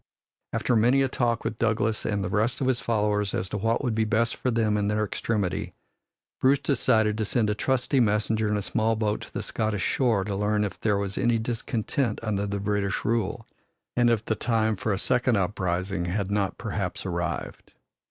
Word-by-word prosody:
After 125 - +1
many 125 +5 +4
a - - +2
talk 120 -2 0
with 110 - -3
Douglas 110 -1 0
and 100 -2 0
the - - -2
rest 110 +5 0
of 135 - 0
his 130 -2 +2
followers 105 -3 0
as 95 - -2
to 105 - -3
what 115 +5 0
would 120 -4 0
be 110 0 +1
best 110 +2 +1
for 130 - -1
them 110 -3 +1
in 105 -1 +1
their 105 +1 +1
extremity, 105 -2 -2 0.6
Bruce 135 +2 +4
decided 110 -6 +2
to - - +1
send 105 0 +1
a - - +1
trusty 130 +4 +1
messenger 110 -1 +2
in 105 - +1
a 100 - -2
small 115 +1 +1
boat 105 -1 -1
to - - -10
the - - -4
Scottish 110 -3 -1
shore 115 -7 +2
to 100 0 -3
learn 105 +1 +1
if 100 - -4
there 105 -2 +1
was 100 -1 -3
any 120 -1 +3
discontent 115 +1 -1
under 100 -2 -1
the 100 0 -2
British 100 0 -1
rule, 115 -4 -1 0.5
and 120 -1 +4
if 115 -2 +1
the - - +1
time 110 -1 +1
for 105 - -2
a 100 - +1
second 125 +1 +2
uprising 95 -1 -1
had 95 +2 -2
not 100 -2 0
perhaps - - -3
arrived. - - -4
110 Hz, 200 wpm, -26 LUFS, 105-115 Hz, 0.6 s, many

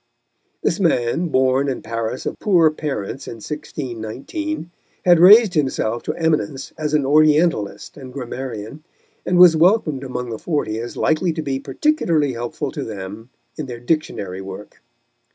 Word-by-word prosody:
This - - 0
man, 165 -2 +1
born 130 -1 +2
in 130 - -4
Paris 115 +2 -4
of - - -4
poor 170 -6 +4
parents 140 -4 -5
in - - -6
1619, 150 - -5 0.3
had 175 -2 +6
raised 205 +3 +8
himself 130 -6 0
to - - -3
eminence 150 -6 -1
as 150 -1 -1
an 145 -3 +2
Orientalist 150 - +2
and 130 -3 -10
grammarian, 125 0 -6 0.4
and 180 - +2
was 175 -2 +8
welcomed 160 -5 +2
among 125 -2 -5
the 110 - -5
Forty 145 -10 -2
as 120 +1 -6
likely 165 +3 +1
to 160 -1 -4
be 135 -2 -2
particularly 155 - 0
helpful 120 +4 -4
to 150 -3 -5
them 105 +2 -8 0.3
in 150 - -4
their 120 -2 -7
Dictionary 120 - -2
work. 95 +2 -10
140 Hz, 150 wpm, -20 LUFS, 120-160 Hz, 0.4 s, raised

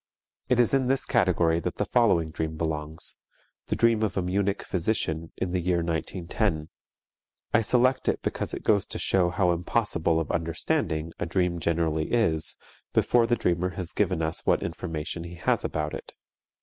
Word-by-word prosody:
It 125 - +3
is 120 0 +4
in 135 -2 +3
this 135 +1 +1
category 90 -8 +2
that - - -3
the - - -1
following 90 -10 +2
dream 80 0 -3
belongs, 80 -1 -3 0.5
the - - 0
dream 115 -2 +3
of 110 -3 -1
a - - +2
Munich 100 +2 0
physician 85 -4 -1
in 95 - -2
the 90 - 0
year 85 -1 +1
1910. 85 0 -2 0.8
I 115 - +5
select 125 +3 +2
it - - 0
because - - -2
it - - -8
goes 100 -2 +2
to - - -4
show 90 -2 +2
how 90 0 +2
impossible 85 -2 +1
of 80 - -2
understanding 80 -1 -1
a - - -2
dream 90 0 0
generally 80 -1 0
is 85 -9 +1 0.4
before 120 -1 +3
the 120 - +3
dreamer 90 -2 0
has 90 -3 -3
given 90 -5 +1
us 80 +1 -1
what - - +2
information 80 0 -4
he 85 0 -8
has 85 - +1
about 75 -1 -2
it. - - -8
85 Hz, 175 wpm, -27 LUFS, 80-105 Hz, 0.8 s, I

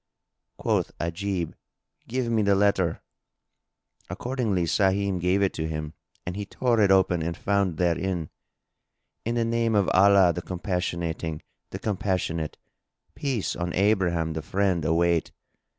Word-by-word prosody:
Quoth - - -1
Ajib, 85 0 -2 0.5
"Give 125 +1 -1
me 110 -2 +2
the 100 -1 +3
letter;" 95 -4 +2 1.1
accordingly 120 -8 -1
Sahim 95 +2 +1
gave 90 +3 +2
it 95 - +1
to 80 - -3
him 75 -1 -4 0.3
and 90 - -4
he 105 - -3
tore 115 +2 +1
it 100 - +4
open 95 -3 +4
and 85 +1 -3
found 100 -5 0
therein, 85 -1 0 0.9
"In 115 +1 -1
the 115 -1 +1
name 115 -1 +1
of 100 -2 +3
Allah 95 -2 +6
the 90 - -4
Compassionating, 85 -3 -3 0.3
the - - -5
Compassionate! 95 -6 -2 0.6
Peace 130 -8 -2
on 85 0 -3
Abraham 90 -5 +2
the 80 - -3
Friend 95 -1 0
await! 85 +1 +2
95 Hz, 135 wpm, -26 LUFS, 85-100 Hz, 1.1 s, Allah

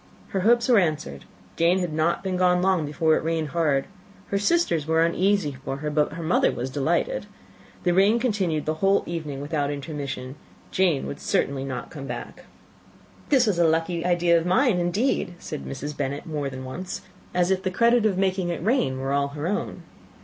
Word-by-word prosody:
Her 195 - -1
hopes 235 +5 +3
were 240 -4 +6
answered; 155 - -2 0.3
Jane 170 +2 +3
had 180 -4 -2
not 160 +4 +1
been 190 -1 -1
gone 180 -1 +3
long 180 -4 +2
before 160 +2 +2
it - - -1
rained 160 -1 -1
hard. 150 -4 +1 0.4
Her 200 - 0
sisters 205 - +1
were 160 +1 +3
uneasy 180 -3 +1
for 135 - -3
her, 150 +1 -3
but 150 0 +1
her 165 0 -6
mother 160 - +3
was 125 +2 -4
delighted. 170 - 0 0.6
The 175 - +2
rain 200 +5 +4
continued 195 - 0
the 155 - 0
whole 195 +1 +3
evening 155 -5 -5
without 145 -1 -1
intermission; 140 -2 -5 0.3
Jane 170 -7 +1
certainly 140 -1 0
could 135 - -4
not 125 - -5
come 140 -3 -7
back. - - -7 0.8
"This 265 -4 +5
was 200 -6 +1
a 170 - +5
lucky 165 +1 0
idea 175 -1 +3
of - - -4
mine, 220 +1 +3
indeed!" 180 +1 0
said 155 -3 -7
Mrs. 145 +2 -5
Bennet, 140 0 -3
more 150 -3 -3
than 130 -1 -7
once, 175 +8 -6 0.3
as 180 +1 +2
if 190 -1 +1
the 190 - -1
credit 235 +4 +3
of 205 -4 +2
making 190 -2 0
it 170 -1 -3
rain 210 - +1
were 135 +1 -2
all 140 0 +2
her 145 +2 -6
own. 205 +6 -3
170 Hz, 195 wpm, -25 LUFS, 145-190 Hz, 0.8 s, were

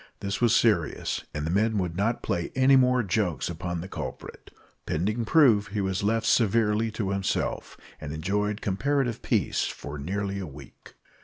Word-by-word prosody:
This 100 +2 -3
was 120 -3 +4
serious, - - +1
and 75 0 -4
the 80 - -1
men 110 +3 +2
would 90 -4 -2
not 110 +5 0
play 85 -1 -2
any 130 +1 +5
more 125 -1 +4
jokes 90 -7 -1
upon 85 0 -4
the 90 - -7
culprit. - - -8 0.4
Pending 105 +8 -1
proof, 120 -9 +5
he 105 +2 -4
was 95 -1 -1
left 110 +2 +1
severely 110 0 +2
to 105 -3 -2
himself, 100 -1 -2 0.2
and 75 -1 -5
enjoyed 100 +6 -1
comparative 125 +4 0
peace - - 0
for 70 +1 -6
nearly 100 +5 -3
a 95 - -5
week. 70 -2 -14
100 Hz, 165 wpm, -26 LUFS, 90-115 Hz, 0.4 s, any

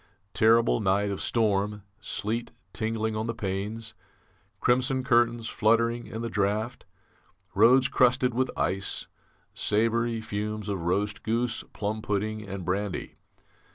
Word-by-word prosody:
Terrible 115 +2 +4
night 100 0 +1
of 100 - -4
storm 105 -2 +1 0.2
sleet 110 +3 -3 0.2
tingling 110 0 -1
on 110 +1 -2
the 115 - -2
panes; 105 +3 -4 0.7
crimson 130 +1 +2
curtains 120 -2 +2
fluttering 115 +2 +2
in 110 +1 -5
the - - -1
draught; 105 +4 -1 0.7
roads 125 +6 +6
crusted 125 -1 +3
with 130 +2 +1
ice; 95 0 -1 0.5
savoury 115 +2 +1
fumes 105 -1 -4
of 100 -3 -2
roast 100 +5 -1
goose, 115 +1 -1
plum 105 +1 -3
pudding, 110 +1 -2
and 100 -3 -6
brandy. 100 +1 -2
110 Hz, 120 wpm, -27 LUFS, 105-115 Hz, 0.7 s, roads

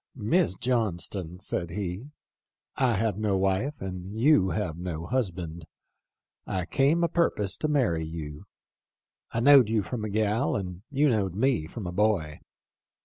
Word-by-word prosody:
^ - - -12
Miss 165 - +2
John 115 -5 0
ston,' 90 -1 -6
said 85 -2 -3
he, 95 - -4 0.3
' - - -65 0.2
I 125 -4 +2
have 105 0 0
no 105 -3 +1
wife 95 +10 0
and 95 +2 -6
you 130 -7 +5 0.3
no 85 -2 -4
husband. 85 -8 -3 0.8
I 90 -2 -2
came 145 - +2
a - - +4
purpose 155 - 0
to 155 - -1
marry 120 - +1
you. 80 -2 -7 0.8
I 115 - -2
knowed 135 -3 +7
you 110 -2 +1
from 110 +5 -4
a 110 - -3
gal 110 +5 +1
and 90 -2 -4
you 145 +1 +2
knowed 100 -8 +1
me 115 - +1
from 105 +3 -7
a 90 - -3
boy. 90 -6 0
105 Hz, 160 wpm, -27 LUFS, 90-125 Hz, 0.8 s, knowed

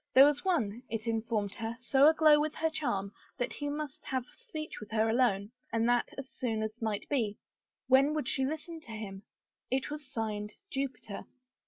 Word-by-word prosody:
There 265 +1 +11
was 290 0 +2
one, 245 - +1
it 225 0 -3
informed 225 -3 0
her, 225 0 -4
so 270 +3 +5
aglow 310 -2 +6
with 300 0 0
her 320 0 +1
charm 200 -11 -1 0.2
that 245 - -1
he 290 -1 -3
must 295 -1 -4
have 260 -2 -1
speech 325 -11 -7
with 210 - -9
her 220 0 +2
alone 220 -3 +2 0.2
and 230 0 +2
that 240 0 +2
as 275 -1 -5
soon 225 -4 -2
as 220 +2 -5
might 215 -2 -1
be. 225 -8 0 0.5
When 270 +3 +5
would 300 -6 -1
she 265 - +1
listen 315 +4 -3
to 235 -8 -10
him? 200 -3 -6 0.5
It 265 +3 0
was 295 -3 -6
signed 215 -4 -3 0.2
Jupiter. 270 -6 -4
245 Hz, 185 wpm, -32 LUFS, 220-290 Hz, 0.5 s, There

